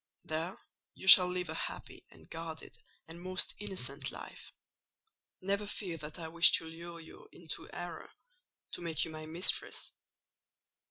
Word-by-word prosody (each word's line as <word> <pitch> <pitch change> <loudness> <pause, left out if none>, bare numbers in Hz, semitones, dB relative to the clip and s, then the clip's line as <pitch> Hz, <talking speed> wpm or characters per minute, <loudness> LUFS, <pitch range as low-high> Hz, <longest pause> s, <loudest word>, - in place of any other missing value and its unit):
There 160 +4 -3 0.4
you 190 - -10
shall 180 -1 +11
live 180 0 -3
a - - -3
happy, - - -6
and - - -18
guarded, 165 -1 -8 0.3
and 165 +2 -10
most 185 0 +5
innocent 145 -9 -3
life. - - -10 0.9
Never 200 +2 -1
fear 185 -5 -4
that 150 +1 -9
I 165 -2 -6
wish 170 +1 +6
to - - +3
lure 170 +1 -9
you 160 - -14
into 165 -2 -7
error—to 335 - -10
make 165 -3 0
you 165 - -8
my 155 0 -8
mistress. 170 +4 0
170 Hz, 145 wpm, -32 LUFS, 160-185 Hz, 0.9 s, shall